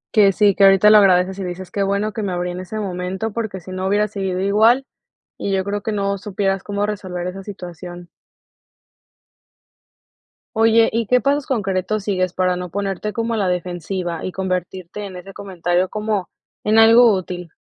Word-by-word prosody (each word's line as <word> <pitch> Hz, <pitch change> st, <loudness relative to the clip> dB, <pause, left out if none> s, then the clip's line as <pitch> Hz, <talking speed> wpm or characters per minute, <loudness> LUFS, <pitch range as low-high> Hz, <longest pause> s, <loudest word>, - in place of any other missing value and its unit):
Que 205 Hz, -2 st, +6 dB
sí, 200 Hz, +1 st, +3 dB
que 200 Hz, -, +2 dB
ahorita 195 Hz, +2 st, +7 dB
lo 215 Hz, -, +8 dB
agradeces, 190 Hz, -1 st, +3 dB
y -, -, -3 dB
dices: 180 Hz, 0 st, -6 dB
"Qué 200 Hz, -, -2 dB
bueno 200 Hz, +2 st, 0 dB
que 225 Hz, -, -4 dB
me 195 Hz, -3 st, -2 dB
abrí 175 Hz, 0 st, -2 dB
en 175 Hz, -, -6 dB
ese 185 Hz, +4 st, -6 dB
momento 190 Hz, +1 st, -3 dB
porque 220 Hz, -4 st, -4 dB
si 180 Hz, +2 st, -11 dB
no 185 Hz, 0 st, -3 dB
hubiera 205 Hz, +2 st, +2 dB
seguido 190 Hz, -3 st, -3 dB
igual", 220 Hz, +7 st, +3 dB, 0.5 s
y 200 Hz, -, -2 dB
yo 190 Hz, -1 st, +1 dB
creo 205 Hz, +1 st, -3 dB
que 220 Hz, -, -3 dB
no 200 Hz, -1 st, -1 dB
supieras 195 Hz, -1 st, -1 dB
cómo 205 Hz, 0 st, -2 dB
resolver 185 Hz, -4 st, -4 dB
esa 190 Hz, +2 st, -6 dB
situación. 175 Hz, -2 st, -9 dB, 2.5 s
Oye, 225 Hz, +1 st, +5 dB
¿y 230 Hz, -1 st, 0 dB
qué 250 Hz, +3 st, +4 dB
pasos 280 Hz, +2 st, 0 dB
concretos 200 Hz, -3 st, -1 dB
sigues 185 Hz, -3 st, 0 dB
para 185 Hz, 0 st, 0 dB
no 180 Hz, 0 st, -5 dB
ponerte 200 Hz, +2 st, -3 dB
como 230 Hz, +1 st, -2 dB
a -, -, -1 dB
la 200 Hz, -3 st, 0 dB
defensiva 175 Hz, -1 st, -3 dB
y 185 Hz, -, -3 dB
convertirte 185 Hz, +1 st, -4 dB
en 190 Hz, -2 st, -9 dB
ese 185 Hz, +2 st, -10 dB
comentario 180 Hz, -2 st, -1 dB
como 210 Hz, -3 st, -2 dB, 0.3 s
en 215 Hz, +1 st, +2 dB
algo 230 Hz, +1 st, +7 dB
útil? 180 Hz, -2 st, -5 dB
195 Hz, 185 wpm, -20 LUFS, 180-210 Hz, 2.5 s, lo